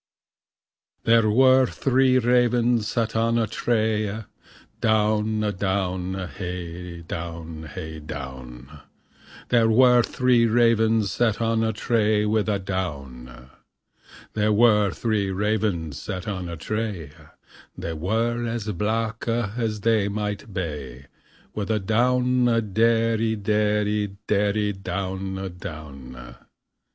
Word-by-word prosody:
There 115 -1 +4
were 130 +3 +5
three 130 -1 +2
ravens 120 -2 +2
sat 115 -2 -1
on 115 +1 +2
a 115 - +2
tree, 110 -1 0 0.7
Downe 110 0 +1
a 105 - 0
downe, 95 -1 -2
hay 90 -1 -7
down, 80 -1 -7
hay 80 0 -7
downe, 65 -1 -9 0.7
There 115 -2 +4
were 125 +1 +6
three 120 0 +2
ravens 110 -3 +3
sat 110 0 +1
on 115 -1 +1
a 110 - +1
tree, 105 -1 +1
With 110 0 +1
a 105 - +1
downe. 70 -10 -6 0.8
There 105 0 +1
were 105 -2 +4
three 105 0 -1
ravens 95 -6 -1
sat 95 -2 -5
on 95 -4 -4
a 85 - -6
tree, 105 -4 -4 0.7
They 85 - -4
were 115 +8 -1
as 115 -2 -3
blacke 110 +4 -2 0.3
as 110 -3 -2
they 110 -2 +2
might 105 +1 -4
be. 75 -8 -5 0.5
With 105 -1 -4
a 110 -1 +1
downe 125 +4 +2 0.3
derrie, 115 0 +2
derrie, 105 -1 0
derrie, 105 0 +1
downe, 95 -1 -4
downe. 70 -6 -9 0.3
2. - - -28
105 Hz, 115 wpm, -24 LUFS, 90-115 Hz, 0.8 s, were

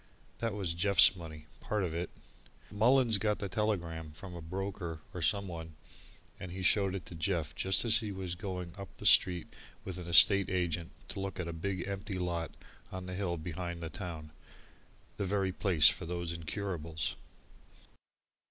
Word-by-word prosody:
That 115 -3 -1
was 95 -5 -1
Jeff's 95 +2 +6
money 80 -3 -9
part 105 -2 -1
of 85 -3 -2
it. 85 +1 -2 0.6
Mullins 115 +1 +4
got 105 +1 +1
the 100 - -3
telegram, 90 -6 -1
from 90 +3 -9
a 85 - -7
broker 90 -1 -4
or 90 - -5
someone, 85 -2 -1 0.6
and 90 - -6
he 95 +1 -5
showed 95 +1 +3
it 95 - -5
to - - -9
Jeff 80 -3 -1
just 95 +4 +1
as 115 -1 +6
he 110 -3 -3
was 95 -2 -4
going 90 -2 -5
up 100 - -9
the - - -8
street 90 -2 +5 0.3
with 90 -1 -4
an 90 - -7
estate 100 +3 +7
agent 85 -3 -1 0.2
to - - -5
look 95 -1 -4
at 85 - -2
a 85 - -4
big 95 +3 -3
empty 100 0 -4
lot 85 -2 -2 0.4
on 95 -1 -5
the 90 - -5
hill 90 -2 -1
behind 85 +1 -5
the 80 - -5
town 80 -5 -6 0.9
the 100 - -1
very 95 0 +1
place 90 -5 +5
for 85 - +2
these 85 -1 -2
incurables. 85 -2 -3
90 Hz, 170 wpm, -32 LUFS, 85-100 Hz, 0.9 s, estate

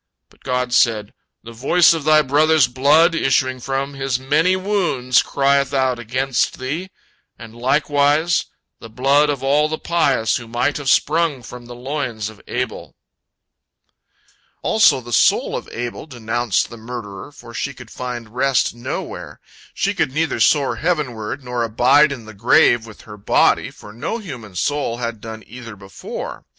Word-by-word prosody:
But - - -25
God 125 -1 -2
said, 110 -4 +2 0.3
"The 115 - -10
voice 140 +10 +4
of 160 -3 -4
thy 155 0 +5
brother's 150 +1 +4
blood 150 +7 +4
issuing 130 -4 +1
from 135 +2 -3
his 135 -2 -2
many 155 +7 +2
wounds 180 - +1
crieth 140 0 +1
out 130 -2 +1
against 130 +3 -1
thee, 155 +9 -4 0.5
and 115 -2 -12
likewise 145 +5 +1 0.3
the 115 - -11
blood 140 +6 +2
of 140 -2 -2
all 145 +3 +2
the 155 - -3
pious 140 -11 +1
who 120 - -9
might 120 +5 -1
have 145 -2 -3
sprung 155 -4 +2
from 120 +1 -11
the 120 - -9
loins 120 -5 -4
of 110 - -15
Abel." 125 -1 -4 1.7
Also 215 -11 +4
the 120 0 -8
soul - - +3
of - - -5
Abel 120 +5 -6
denounced 120 -4 -1
the 115 - -9
murderer, 115 0 -8
for 130 -4 -14
she 140 - -3
could 140 - -13
find 120 -3 -6
rest 130 0 +1
nowhere. 120 0 -6 0.3
She 200 +1 -1
could 160 -8 -1
neither 160 +3 -1
soar 145 -3 +2
heavenward, 140 -8 -2
nor 125 -1 -3
abide 125 +6 +4
in 125 -5 -7
the 110 - -11
grave 115 +2 +3
with 110 - -13
her 105 -1 -12
body, 100 - +2
for 105 - -14
no 140 - -4
human 125 - -9
soul 140 +3 -1
had 115 -3 -5
done 110 -1 -8
either 115 -2 -10
before. 95 -1 -8
130 Hz, 160 wpm, -19 LUFS, 120-145 Hz, 1.7 s, thy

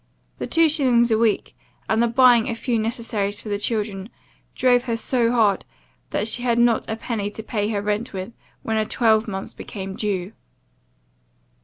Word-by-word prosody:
This - - -4
two 330 0 +4
shillings 250 -6 +3
a 220 - +4
week, 225 -2 0 0.3
and 220 +1 +2
the 235 - +3
buying 240 -1 +5
a 230 - -2
few 235 0 -1
necessaries 215 -3 -2
for 220 - -8
the 205 0 -1
children, 210 -2 -2 0.5
drove 245 -1 +3
her 230 -2 -1
so 235 0 +1
hard, 215 -5 +2 0.5
that 210 - -1
she 240 - +1
had 240 -2 +1
not 235 -1 +2
a 220 - -1
penny 225 -3 -3
to 220 +1 -9
pay 210 -1 -2
her 205 -2 -2
rent 210 +3 -2
with, 190 +4 -6 0.3
when 220 -1 -1
a 215 - +1
twelvemonth's 220 -4 +1
became 195 -2 -7
due. 195 -2 -2
225 Hz, 175 wpm, -22 LUFS, 205-235 Hz, 0.5 s, buying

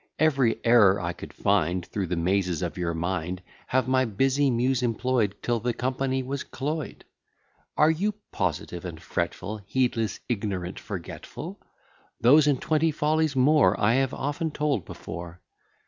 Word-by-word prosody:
Every 135 -7 +2
error 105 -4 +6
I 85 -2 -2
could - - -10
find 90 -3 +1
Through 100 -3 -3
the 90 - -1
mazes 90 -1 0
of 85 - -3
your 85 -2 -2
mind, 90 +1 -3 0.2
Have 130 0 +1
my 130 0 +3
busy 135 +6 +2
Muse 125 +1 +1
employ'd, 120 -3 0
Till 120 -1 +1
the 120 +1 -1
company 130 +1 -1
was 140 +2 -4
cloy'd. 150 +2 -4 0.7
Are 155 +1 +5
you 200 +7 0 0.2
positive 90 -1 -2
and 85 -3 -6
fretful, 90 +5 -3
Heedless, 115 -3 0
ignorant, 100 -6 -3
forgetful? 95 -5 -7 0.6
Those, 145 +5 +6
and 140 -3 +3
twenty 160 +1 +2
follies 155 0 +1
more, 130 -6 +4
I 105 +3 +3
have 135 0 +2
often 145 +4 -2
told 150 - -1
before. 85 +1 -8
115 Hz, 145 wpm, -26 LUFS, 90-135 Hz, 0.7 s, error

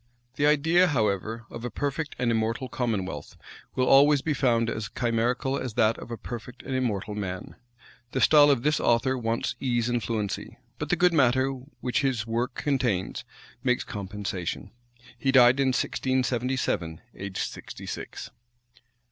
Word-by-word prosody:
The 145 +2 +2
idea 160 +5 +4
however, 110 - -1
of 115 - -7
a 125 - -2
perfect 145 +5 -3
and 120 -2 +1
immortal 115 +3 -1
commonwealth, 110 -8 -3 0.4
will 130 - +2
always 140 +1 +6
be 155 - 0
found 120 -5 +2
as 110 -2 -3
chimerical 120 +3 0
as 125 -4 -5
that 110 0 +3
of - - -9
a 115 - -5
perfect 120 +3 -8
and 135 - -5
immortal 110 -5 -1
man. 95 -3 -5 0.6
The 130 - -1
style 145 +1 +7
of 135 -4 +2
this 150 +1 +2
author 125 +3 +2
wants 115 -1 -1
ease 120 -2 0
and 120 -1 0
fluency; 105 -3 -3 0.2
but - - -4
the - - +3
good 180 -1 +3
matter 130 -2 +3 0.3
which 125 +2 0
his 130 -6 0
work 120 +2 -2
contains, 125 -10 -1 0.4
makes 125 -2 +2
compensation. 100 -2 -5 0.5
He 135 - +1
died 130 0 +6
in 135 - +3
1677, 125 -9 0
aged 100 -1 -6
sixty - - -9
six. - - -6
120 Hz, 155 wpm, -27 LUFS, 110-135 Hz, 0.6 s, style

